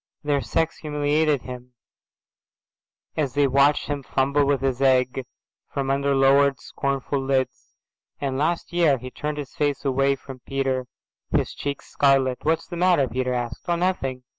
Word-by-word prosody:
Their 145 -1 +1
sex 160 +8 -1
humiliated 150 -1 +1
him, 125 -1 -9 1.4
as 140 -5 -1
they 145 0 +4
watched 140 +2 +3
him 145 -1 -3
fumble 140 +2 +1
with 140 -2 +1
his 135 -1 -1
egg, 130 -1 +3 0.5
from 135 -1 -1
under 140 0 +1
lowered 135 0 +4
scornful 140 0 -2
lids. 135 -1 -2 0.4
And 135 -2 -2
last 160 +5 -1
year 165 -6 +4
Â… - - -15
he 130 0 -7
turned 150 +2 -4
his 145 -3 -6
face 145 -1 -1
away 135 +1 +2
from 135 -1 -11
Peter, 135 -1 -2 0.4
his - - 0
cheeks 140 -1 -4
scarlet. 135 -2 +3
"What's 160 +1 0
the 175 - -7
matter?"' 175 -6 +3
Peter 125 0 -1
asked. 120 -1 -4
"Oh, 175 - +2
nothing. 170 -8 -1
140 Hz, 160 wpm, -24 LUFS, 130-145 Hz, 1.4 s, they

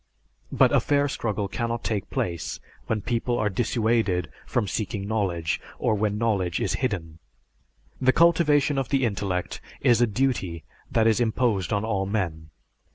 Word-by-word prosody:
But - - +4
a - - +5
fair 145 0 +2
struggle 105 -6 -2
cannot 115 +1 -3
take 105 -4 -2
place 85 -3 -3 0.3
when 110 -1 -1
people 120 +1 -1
are 105 - +1
dissuaded 110 -5 0 0.2
from 115 -4 0
seeking 100 -1 -3
knowledge, 90 -7 -1 0.2
or - - +1
when 105 0 0
knowledge 100 -6 0
is - - 0
hidden." 85 -10 -3 0.8
The 130 0 +5
cultivation 150 -3 +4
of 135 - -3
the 135 -2 +2
intellect 95 -4 -2 0.2
is 120 -1 +4
a 120 - +5
duty 105 -8 -1 0.3
that 110 - +2
is 115 0 +3
imposed 110 -4 +1
on 100 0 0
all 100 -3 -1
men. 85 -7 -2
110 Hz, 155 wpm, -25 LUFS, 95-120 Hz, 0.8 s, a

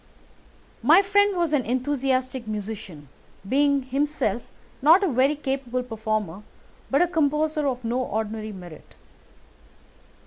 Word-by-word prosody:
My 345 +6 +6
friend 405 0 +3
was 340 -3 0
an 280 -4 +2
enthusiastic 260 -1 -1
musician, 210 -7 -6 0.4
being 280 +3 +2
himself 265 -4 -1 0.4
not 330 +8 +6
only 350 -8 +1
a - - -5
very 270 +4 +3
capable 265 -3 -3
performer 215 -5 -3 0.5
but 275 +5 +4
a - - +1
composer 305 -2 0
of 255 -2 -2
no 235 +2 -1
ordinary 220 -1 -3
merit. 175 -5 -12
260 Hz, 125 wpm, -24 LUFS, 220-295 Hz, 0.5 s, My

